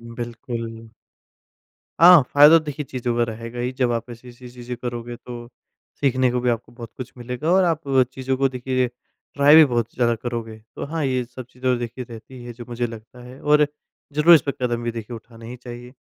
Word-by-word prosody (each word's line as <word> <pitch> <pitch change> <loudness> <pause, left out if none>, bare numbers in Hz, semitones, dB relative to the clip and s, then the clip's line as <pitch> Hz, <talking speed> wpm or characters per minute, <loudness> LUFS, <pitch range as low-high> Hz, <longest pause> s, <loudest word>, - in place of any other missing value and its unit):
बिल्कुल। 115 -1 -7 1.1
हाँ, 175 -2 +9
फायदा 150 +3 +8
तो 155 - -8
देखिए 150 0 -5
चीज़ों 125 -2 -3
का 120 - +2
रहेगा 115 +2 -7
ही, 125 +1 -1
जब 125 -2 0
आप 115 +1 -3
ऐसी-ऐसी 120 +1 -12
चीज़ें 125 0 -7
करोगे 120 -1 -5
तो 120 -1 -10 0.5
सीखने 130 -2 +2
को 125 - -1
भी 125 0 +1
आपको 120 0 -4
बहुत 120 -1 -10
कुछ 130 - -8
मिलेगा 125 +6 -3
और 190 0 +5
आप 165 -3 +1 0.3
चीज़ों 130 0 -2
को 135 +1 +2
देखिए 130 0 -1 0.5
ट्राई 145 +1 +6
भी 160 0 +10
बहुत 120 -4 -1
ज़्यादा 120 -1 +2
करोगे, 115 -1 -5 0.2
तो - - -4
हाँ, 160 +1 -3
ये 130 -2 0
सब 125 0 -10
चीज़ें 125 -1 -1
देखिए 120 +1 -5
रहती 120 +2 -11
है 120 - -7
जो 120 +1 -10
मुझे 120 0 -2
लगता 115 +2 -12
है 125 +2 -12
और 150 0 +4 0.5
ज़रूर 155 +4 +7
इस 150 - +5
पे - - +2
कदम 120 -1 -1
भी 120 - -1
देखिए 115 0 -7
उठाना 115 +1 -14
ही 125 +2 -8
चाहिए। 120 0 -10
125 Hz, 200 wpm, -22 LUFS, 120-130 Hz, 1.1 s, भी